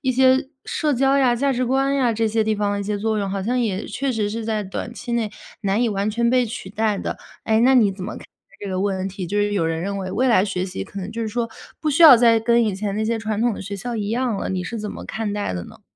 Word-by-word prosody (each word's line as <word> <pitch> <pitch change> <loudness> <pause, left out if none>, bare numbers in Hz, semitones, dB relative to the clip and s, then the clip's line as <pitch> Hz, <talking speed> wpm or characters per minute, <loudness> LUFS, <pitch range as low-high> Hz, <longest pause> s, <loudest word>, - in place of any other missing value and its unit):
一 260 - 0
些 260 +2 +3 0.2
社 300 -2 0
交 270 +2 +3
呀、 255 -3 +4
价 275 +3 +1
值 255 0 0
观 270 +2 +1
呀， 255 -4 +2
这 225 +1 0
些 220 +1 +1
地 215 0 +1
方 205 -1 -1
一 - - -2
些 210 +1 -2
作 220 +1 0
用， 200 -1 -1
好 195 0 -2
像 245 +5 0
也 210 -4 -1
确 275 -1 -2
实 215 -3 -1
是 225 +1 -4
在 215 -1 -1
短 195 +4 -5
期 240 - -6
内 230 -3 0 0.3
难 200 +3 +1
以 240 - +2
完 200 0 -1
全 235 +2 +1
被 250 0 +3
取 220 -4 -7
代 215 0 0
的。 - - -4 0.3
诶， 220 0 +2
那 260 +3 +5
你 215 -6 +5
怎 190 -1 -7
么 215 - -5
看 - - -9
待 - - -13 0.4
这 - - -4
个 185 -1 -2
问 190 -1 -1
题， 190 -1 -6
就 205 +4 -1
是 205 0 +1
有 195 -5 +1
人 160 0 -1
认 200 +3 -3
为， 185 -1 -4
未 250 +7 +1
来 230 -6 +4
学 190 -3 -2
习 180 - -5
可 195 - -9
能 185 - -5
就 230 0 -3
是 220 - -2
说， 230 +2 -2 0.3
不 310 - -1
需 300 +3 +3
要 305 -6 +11
再 230 -1 +4
跟 235 +1 +3
以 210 -3 0
前 200 +1 -3
那 215 - 0
些 230 +1 0
传 220 -1 -2
统 240 -2 +2
的 - - -7
学 200 +1 -5
校 240 +5 -5
一 205 -2 -2
样 240 -1 0
了， - - -3
你 185 -1 -2
是 225 +6 -5
怎 210 -1 -4
么 - - -8
看 215 0 -3
待 205 - -2
的 90 - -4
呢？ - - -15
220 Hz, 325 characters per minute, -22 LUFS, 200-240 Hz, 0.4 s, 要